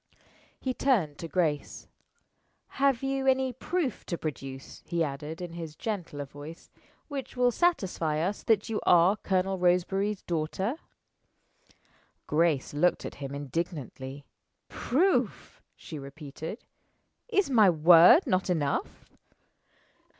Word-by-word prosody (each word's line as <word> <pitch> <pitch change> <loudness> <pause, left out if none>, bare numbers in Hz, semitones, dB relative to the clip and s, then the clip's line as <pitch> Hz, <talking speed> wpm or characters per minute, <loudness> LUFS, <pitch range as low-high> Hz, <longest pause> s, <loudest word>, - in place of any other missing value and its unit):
He 260 - -2
turned 210 - +1
to 165 - -5
Grace. 155 -3 -1 0.9
"Have 275 -3 +3
you 270 0 -1
any 260 -1 +2
proof 315 +2 -2
to 170 - -2
produce," 135 -4 -7
he 170 -1 0
added, 150 +3 -5
in 175 -1 -7
his 165 -3 -7
gentler 175 -10 -4
voice, 145 +4 -11 0.4
"which 270 -3 -6
will 250 0 +4
satisfy 190 - 0
us 190 +6 -1
that 215 -2 +2
you 225 -2 -2
are 175 +3 +5
Colonel 190 -1 -1
Roseberry's 185 +3 +1
daughter?" 175 +7 -2 1.5
Grace 155 -3 +1
looked 165 +5 +1
at - - -5
him 140 0 -5
indignantly. 140 -2 -5 0.4
"Proof!" 350 +10 0
she 155 - -9
repeated. 150 - -8 0.6
"Is 400 - +1
my 215 -6 +6
word 170 - +7
not 190 -7 0
enough?" 150 -6 -1
175 Hz, 115 wpm, -28 LUFS, 150-230 Hz, 1.5 s, word